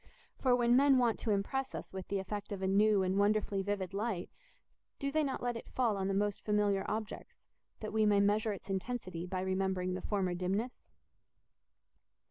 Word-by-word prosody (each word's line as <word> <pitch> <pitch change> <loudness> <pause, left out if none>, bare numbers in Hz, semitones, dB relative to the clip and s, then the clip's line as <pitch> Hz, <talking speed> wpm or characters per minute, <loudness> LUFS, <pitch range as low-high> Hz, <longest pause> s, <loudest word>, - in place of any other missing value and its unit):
For 255 -2 +4
when 240 0 +4
men 275 0 +6
want 240 -3 +2
to - - -3
impress 235 +7 -1
us - - -7
with 190 -1 -6
the 200 - -1
effect 205 +2 -5
of 195 -2 -4
a - - +1
new 205 0 +4
and 190 +1 +1
wonderfully 205 -1 +2
vivid 195 -1 -2
light, 200 -3 -2 0.7
do 280 -1 -2
they 310 +1 +2
not 270 -3 -3
let 245 -1 0
it 230 - -8
fall 240 -5 +1
on 190 -1 -1
the 195 - 0
most 205 0 0
familiar 205 -2 +2
objects, 215 0 -5 0.4
that 215 - -5
we 215 -1 +3
may 205 -1 +4
measure 210 +2 +2
its 195 -1 -7
intensity 190 -3 -3
by 185 0 -2
remembering 190 -1 0
the 185 - -4
former 190 -3 -1
dimness? 195 +7 -2
205 Hz, 190 wpm, -33 LUFS, 190-225 Hz, 0.7 s, men